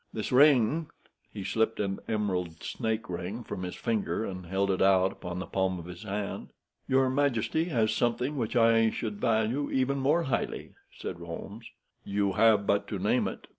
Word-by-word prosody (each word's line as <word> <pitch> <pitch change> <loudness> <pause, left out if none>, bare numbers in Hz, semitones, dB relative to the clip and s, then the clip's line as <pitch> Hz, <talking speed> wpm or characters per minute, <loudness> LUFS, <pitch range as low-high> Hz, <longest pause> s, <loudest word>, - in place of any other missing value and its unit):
This 110 - -4
ring—" 145 +2 +5 0.4
He 100 - -6
slipped 110 +4 0
an 100 -1 -1
emerald 90 -6 -2
snake 110 0 -2
ring 90 +6 -5
from 90 - -6
his 90 -1 -5
finger, 110 -3 -1
and 90 -2 -6
held 95 +2 +1
it 95 - -1
out 95 -1 +4
upon 90 -3 -7
the 95 - -4
palm 95 -1 -1
of 85 - -8
his 90 +1 -9
hand. 105 -1 -4 0.4
"Your 130 0 +3
majesty 140 +3 +1
has 115 -10 +1
something 125 +4 0
which 120 -3 -2
I 115 -1 +5
should 105 -2 -4
value 115 +4 +1
even 135 +1 +1
more 150 +6 +2
highly," 130 - -3 0.2
said - - -6
Holmes. 85 +6 -8 0.4
"You 100 0 0
have 110 -2 +4
but 100 0 +1
to - - -3
name - - +1
it." - - -7
110 Hz, 175 wpm, -29 LUFS, 95-120 Hz, 0.4 s, ring